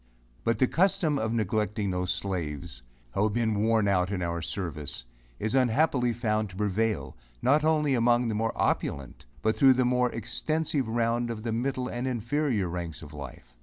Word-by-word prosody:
But 115 - +1
the 130 - +4
custom 175 -1 +2
of 110 0 -1
neglecting 105 -2 0
those 90 0 -2
slaves, 85 -7 -3 0.3
who - - 0
have 105 0 +2
been 110 -3 +1
worn 110 -1 +3
out 90 -1 +2
in 90 -3 -1
our 85 0 -2
service, 80 -8 -5 0.3
is 110 +1 -2
unhappily 130 0 +3
found 110 -2 -1
to 90 - -12
prevail, 105 -8 -1 0.3
not 145 +4 +4
only 155 -3 +3
among 120 0 +3
the 110 - -1
more 115 +2 0
opulent 70 -2 -1 0.2
but 110 0 +2
thro' 135 -1 +7
the 130 0 +2
more 125 0 +2
extensive 130 +5 -1
round 120 +1 0
of 110 -2 -5
the 115 - -2
middle 125 +2 -1
and 125 +1 -3
inferior 120 -3 0
ranks 85 -2 -5
of 75 -1 -11
life. 70 -4 -9
110 Hz, 175 wpm, -28 LUFS, 95-125 Hz, 0.3 s, thro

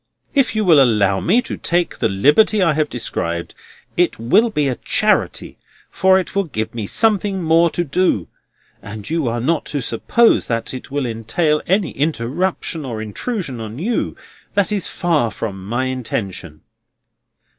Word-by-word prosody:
If 275 -6 +2
you 215 -1 +1
will 160 -6 +6
allow 105 -6 +3
me 245 +2 +2
to - - -5
take 175 0 -1
the - - +1
liberty 150 - +4
I 170 -5 +3
have 150 0 0
described, 85 -8 -4 0.4
it 175 0 +1
will 165 - +3
be 150 -9 0
a 130 - -1
charity, - - 0 0.3
for 190 +2 +4
it 185 - -3
will 200 0 +1
give 110 -9 -4
me 110 -4 -4
something 205 - +1
more 165 +1 +4
to 175 - -1
do. 145 - 0 0.5
And 105 0 -8
you 160 -5 -1
are 120 +1 -1
not 155 +7 0
to 145 - -3
suppose 140 - +2
that 115 +1 -2
it 130 - -8
will 140 -1 -2
entail 125 +7 0
any 190 -1 +1
interruption 155 +4 -2
or 120 -5 -5
intrusion 130 - -4
on 110 +1 -7
you, 220 - -1
for - - -24 0.4
that 200 0 +2
is 205 -4 -1
far 160 -9 0
from 100 -4 -6
my 120 +4 -1
intention." 100 - -4
145 Hz, 165 wpm, -19 LUFS, 115-180 Hz, 0.5 s, will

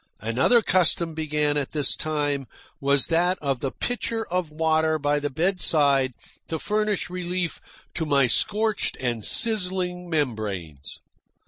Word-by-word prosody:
Another 130 - +3
custom 170 -3 +2
begun 150 -1 0
at 140 -2 -3
this 145 -3 +1
time 145 -3 -2 0.3
was 140 -1 +3
that 175 +3 +1
of 140 -5 -2
the 135 - -2
pitcher 230 - -3
of 180 -3 -1
water 160 0 +1
by 145 0 0
the 145 0 -2
bedside 145 -5 +3 0.3
to 160 - -3
furnish 210 +3 -1
relief 180 -1 -3 0.3
to 160 - -2
my 140 -2 +3
scorched 210 - 0
and 120 -4 -2
sizzling 180 - +1
membranes. 105 - -3
155 Hz, 130 wpm, -24 LUFS, 140-180 Hz, 0.3 s, Another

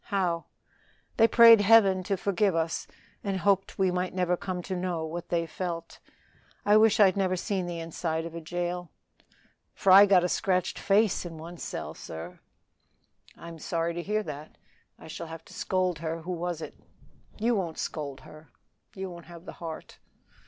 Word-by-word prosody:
"How?" 180 -4 -1 0.7
"They 225 - +6
prayed 230 -1 +8
Heaven 200 -3 +5
to 195 - 0
forgive 195 -1 +1
us 165 0 -1 0.4
and 195 -2 -1
hoped 195 +1 +1
we 190 -1 +2
might 180 +1 -2
never 180 -1 +1
come 180 0 -5
to 190 - -4
know 175 -3 -2
what 170 +2 -6
they 170 -1 0
felt. 170 0 -6 0.7
I 205 +1 +5
wish 220 0 +5
I'd 195 -3 +6
never 190 -2 +1
seen 185 0 -2
the 175 -1 -4
inside 165 0 -3
of 165 - -7
a 170 - -6
jail. 175 +1 -4 0.9
Fry 195 +1 +7
got 190 -3 +5
a - - +2
scratched 185 0 0
face 205 0 +2
in 170 -2 -8
one 170 +2 -9
cell, - - -5
sir." 80 +2 -9 1.0
"I - - -11
am 165 -1 -9
sorry 165 +1 -2
to 175 - -4
hear 210 +4 -1
that. 150 -3 -9 0.4
I - - -14
shall 165 +1 -7
have 165 0 -9
to - - -15
scold 185 -3 -1
her; 165 0 -4
who 180 - -5
was 175 -2 -3
it?" - - -10 0.6
"You 230 +3 +1
won't 175 -7 -2
scold 140 -4 -5
her; 155 -2 -15 0.5
you 190 0 -4
won't 170 -2 -10
have 170 0 -12
the - - -8
heart." 160 -2 -8
175 Hz, 180 wpm, -28 LUFS, 165-195 Hz, 1.0 s, prayed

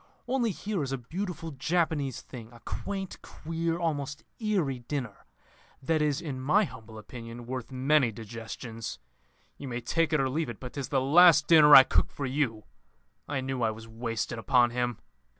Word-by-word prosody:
Only 245 -2 +1
here 200 -2 -3
is 135 -2 -3
a 135 - -1
beautiful 165 - -5
Japanese 150 -2 -1
thing, 115 -3 -11
a 120 - -15
quaint, 195 -2 -5
queer, 165 +1 -3
almost 150 -3 -3 0.2
eerie 185 - 0
dinner, 125 -3 -5 0.5
that 155 +3 0
is 150 -2 +1
in 135 -6 -5
my 180 +11 +3
humble 110 - -9
opinion 115 +2 -9
worth 125 -1 -5
many 130 -1 +2
digestions. 115 - -7 0.6
You 140 - -6
may 120 -1 -3
take 165 +7 0
it 155 - +2
or 135 - +2
leave 150 +1 -2
it, 115 - -7
but 125 -1 -8
'tis 140 -3 -4
the 135 -2 +1
last 155 +2 +6
dinner 150 -3 +8
I 135 - +12
cook - - +1
for 140 - -5
you.'... 130 -5 -1 0.6
I 140 -2 -2
knew 130 -1 -3
I 115 - +3
was 110 +1 -8
wasted 115 0 -4
upon 120 0 +3
him. 120 -1 -1
135 Hz, 175 wpm, -28 LUFS, 120-160 Hz, 0.6 s, I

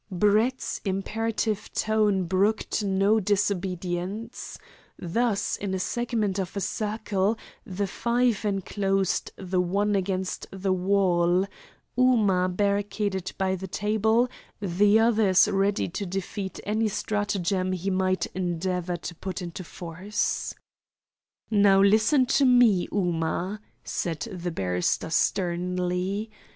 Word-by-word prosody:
Brett's 215 +7 +1
imperative 210 +2 -2
tone 210 -3 +2
brooked 200 +4 0
no 200 +2 +3
disobedience. 190 +1 -2 0.4
Thus, 205 +3 0
in 195 -2 -3
a - - -2
segment 220 -2 -1
of 190 +1 -4
a - - +1
circle, 210 0 -1 0.3
the 200 +2 -2
five 235 +2 0
enclosed 195 -1 0
the 185 -1 -1
one 200 +3 +1
against 190 -1 -2
the 195 0 -1
wall 185 -1 +2 0.5
Ooma 215 -8 +3
barricaded 200 0 -1
by 190 -1 +1
the 190 0 -4
table, 220 +5 +2 0.3
the 205 +2 +3
others 215 -5 +4
ready 200 0 +1
to 190 +3 -4
defeat 190 +1 -4
any 215 +2 0
stratagem 200 -3 -1
he 185 +1 -2
might 185 0 +1
endeavour 180 0 -2
to 170 - -7
put 185 +2 -5
in 175 -2 -5
force. 180 +3 -3 1.0
"Now 200 -2 +5
listen 220 +7 +4 0.2
to - - +6
me, 245 -8 +5
Ooma," 180 +1 -1 0.2
said 165 -3 -3
the 180 -6 -4
barrister 90 - -1
sternly. 180 +4 0
195 Hz, 110 wpm, -26 LUFS, 185-210 Hz, 1.0 s, to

